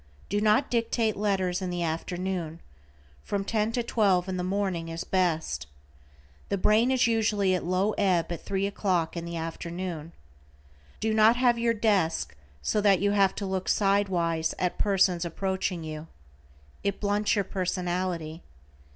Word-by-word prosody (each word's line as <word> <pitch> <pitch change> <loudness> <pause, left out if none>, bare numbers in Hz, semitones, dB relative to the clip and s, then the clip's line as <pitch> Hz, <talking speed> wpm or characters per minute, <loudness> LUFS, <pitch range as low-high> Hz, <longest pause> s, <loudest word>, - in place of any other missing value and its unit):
Do 205 +1 0
not 215 +6 +3
dictate 230 -2 +1
letters 190 -3 0
in 185 - -2
the 175 -1 -2
afternoon; 170 0 -3 0.6
from 200 - -3
ten 215 +1 0
to 240 - 0
twelve 195 -6 +2
in 190 - -2
the 180 - -2
morning 185 -3 -1
is 165 0 -4
best. 160 - 0 0.8
The - - 0
brain 215 +5 +3
is 260 -2 +3
usually 215 -4 +2
at 180 - -1
low 185 +4 +1
ebb 180 -4 +2
at 170 - -5
three 195 0 -1
o'clock 185 -5 0
in 170 0 -4
the 170 0 -5
afternoon. 165 0 -5 0.9
Do 220 0 0
not 220 +2 +6
have 245 -1 +3
your 230 0 +2
desk 200 - +1 0.3
so 210 - +1
that 200 -3 +4
you 205 +1 +2
have 195 -2 +3
to 200 - -4
look 190 -1 -2
side 200 0 +2
wise 165 -3 0
at 180 -1 -1
persons 190 -3 +2
approaching 185 0 -2
you. 155 0 -6 0.8
It 200 -1 -1
blunts 205 +1 +1
your 200 -2 0
personality. 180 -3 -2
190 Hz, 160 wpm, -27 LUFS, 170-205 Hz, 0.9 s, not